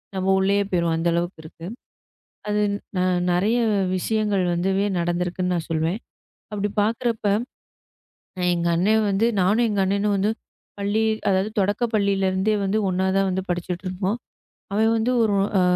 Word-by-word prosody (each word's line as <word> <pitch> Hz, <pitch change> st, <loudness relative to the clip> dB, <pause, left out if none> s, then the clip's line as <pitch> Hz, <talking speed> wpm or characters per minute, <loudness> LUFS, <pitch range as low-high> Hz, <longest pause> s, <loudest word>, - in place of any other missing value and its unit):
நம்ம 190 Hz, 0 st, -2 dB
உள்ளயே 200 Hz, +1 st, +2 dB
போயிருவோம். 170 Hz, -2 st, +1 dB
அந்த 165 Hz, +1 st, -1 dB
அளவுக்கு 170 Hz, 0 st, -2 dB
இருக்கு. 165 Hz, +1 st, -11 dB, 0.8 s
அது 210 Hz, 0 st, +1 dB, 0.3 s
ந -, -, +1 dB, 0.3 s
நிறைய 210 Hz, +7 st, +2 dB, 0.4 s
விஷயங்கள் 210 Hz, 0 st, 0 dB
வந்துவேU 195 Hz, +3 st, +1 dB
நடந்துருக்குன்னு 180 Hz, +1 st, -1 dB
நான் 165 Hz, -, -4 dB
சொல்லுவேன். 165 Hz, +5 st, 0 dB, 0.5 s
அப்படி 205 Hz, 0 st, -2 dB
பாக்குறப்ப 230 Hz, -1 st, -1 dB, 1.3 s
எங்க 170 Hz, 0 st, 0 dB
அண்ணன் 215 Hz, +5 st, +3 dB
வந்து 200 Hz, +4 st, +2 dB
நானும் 210 Hz, +6 st, +3 dB
எங்க 205 Hz, -2 st, 0 dB
அண்ணனும் 200 Hz, +1 st, +1 dB
வந்து 200 Hz, +3 st, +1 dB, 0.5 s
பள்ளி 205 Hz, +2 st, 0 dB, 0.3 s
அதாவது 195 Hz, +2 st, +1 dB
தொடக்கப் 205 Hz, +4 st, 0 dB
பள்ளியில 200 Hz, -2 st, +1 dB
இருந்தே 190 Hz, +3 st, +1 dB
வந்து 200 Hz, +3 st, +1 dB
ஒண்ணா 185 Hz, +1 st, 0 dB
தான் 195 Hz, 0 st, +3 dB
வந்து 190 Hz, +1 st, -1 dB
படிச்சிட்டு 175 Hz, +1 st, -3 dB
இருப்போம். 190 Hz, +4 st, -2 dB, 0.6 s
அவன் 220 Hz, +2 st, +3 dB
வந்து 230 Hz, +3 st, +1 dB
ஒரு 205 Hz, -2 st, +2 dB, 0.2 s
அ, -, -, +3 dB
195 Hz, 145 wpm, -23 LUFS, 180-210 Hz, 1.3 s, அண்ணன்